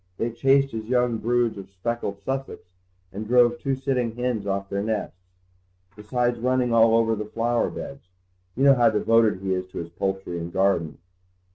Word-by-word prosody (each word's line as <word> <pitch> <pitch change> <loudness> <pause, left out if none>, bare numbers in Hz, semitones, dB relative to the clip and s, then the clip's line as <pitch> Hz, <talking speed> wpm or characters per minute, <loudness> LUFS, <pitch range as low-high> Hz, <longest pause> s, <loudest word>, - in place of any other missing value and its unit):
"They 115 +1 -1
chased 135 +3 +2
his 110 -1 -5
young 125 -1 +1
broods 120 -2 0
of 95 -1 -10
speckled 100 0 -4
Sussex 135 -5 -4 0.5
and 105 +2 -6
drove 120 0 +4
two 135 -1 -1
sitting 130 -4 -2
hens 120 -4 -2
off 100 0 -2
their 100 0 -2
nests, 105 -4 -3 0.7
besides 120 +3 -1
running 125 0 +1
all 115 0 +5
over 115 -1 +2
the 105 - -4
flower 115 +2 0
beds. 140 -8 -8 0.5
You 135 - 0
know 140 -1 +7
how 120 -3 +4
devoted 110 -2 +2
he 95 -1 -1
is 90 0 -3
to 95 - -11
his 85 0 -5
poultry 95 0 -3
and 85 +1 -6
garden." 95 -5 0
115 Hz, 175 wpm, -24 LUFS, 100-125 Hz, 0.7 s, know